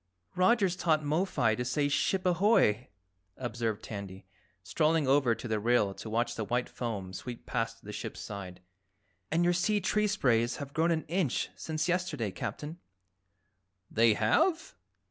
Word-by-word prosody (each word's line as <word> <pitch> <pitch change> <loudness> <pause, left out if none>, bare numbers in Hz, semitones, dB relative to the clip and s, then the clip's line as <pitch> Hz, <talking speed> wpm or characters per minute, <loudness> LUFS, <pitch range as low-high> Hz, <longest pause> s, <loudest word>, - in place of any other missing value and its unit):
"Roger's 190 -1 +3
taught 160 -4 +1
Mo 155 +6 +1
fi 125 - +1
to 125 - -2
say 145 +4 0
'Ship 185 +6 0
ahoy!'" 175 - +3 0.5
observed 115 -4 -3
Tandy, 100 -3 -7 0.4
strolling 155 - +1
over 135 -4 +4
to 115 - -7
the 110 -1 0
rail 110 -3 +2
to 110 - -8
watch 120 +2 0
the 110 - -3
white 120 +3 -1
foam 100 -6 -5
sweep 120 +5 -7
past 115 0 -3
the 105 - -8
ship's - - -6
side. 90 -3 -7 0.7
"And 170 +2 +2
your 175 0 +3
sea 205 +4 +1
tree 210 +2 +1
sprays 125 - +2
have 140 -1 -7
grown 165 +2 +2
an 160 -2 +1
inch 170 -7 0
since 155 -1 -3
yesterday, 175 - -1
Captain." 150 - -6 1.1
"They 115 -1 +4
have?" 320 - +2
130 Hz, 155 wpm, -30 LUFS, 110-175 Hz, 1.1 s, over